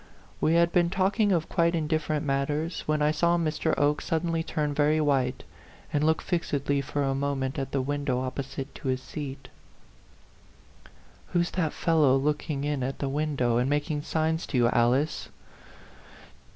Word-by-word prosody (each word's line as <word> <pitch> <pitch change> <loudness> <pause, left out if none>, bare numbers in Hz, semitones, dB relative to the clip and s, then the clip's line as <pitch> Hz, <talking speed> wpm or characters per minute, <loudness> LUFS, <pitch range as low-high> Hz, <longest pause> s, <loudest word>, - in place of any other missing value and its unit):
We 160 - +3
had 170 0 +4
been 175 -1 +3
talking 195 +3 +2
of 165 -4 +1
quite 170 -1 +2
indifferent 155 -1 -1
matters, 145 +4 -1
when 155 -1 +1
I 150 - +3
saw 170 +3 +2
Mr. 160 -1 0
Oke 145 +1 +2
suddenly 165 0 -1
turn 150 -2 -2
very 150 +1 +2
white, 135 -4 +1 0.5
and 145 - +1
look 160 +1 +2
fixedly 145 -5 0
for 140 +1 -2
a 135 -1 +1
moment 135 0 -2
at 135 - -4
the 135 -2 0
window 145 -2 -1
opposite 135 +1 -5
to - - -7
his 130 0 +1
seat. 135 -1 -7 1.9
"Who's 175 -1 +1
that 165 -5 0
fellow 155 -6 +3
looking 145 0 -1
in 145 -2 -1
at 135 +2 -2
the 140 - -2
window, 135 -5 0
and 125 +2 +1
making 145 +1 0
signs 160 +2 -1
to 130 - -1
you, 120 -1 +4
Alice? 125 +6 +1
150 Hz, 160 wpm, -27 LUFS, 135-160 Hz, 1.9 s, had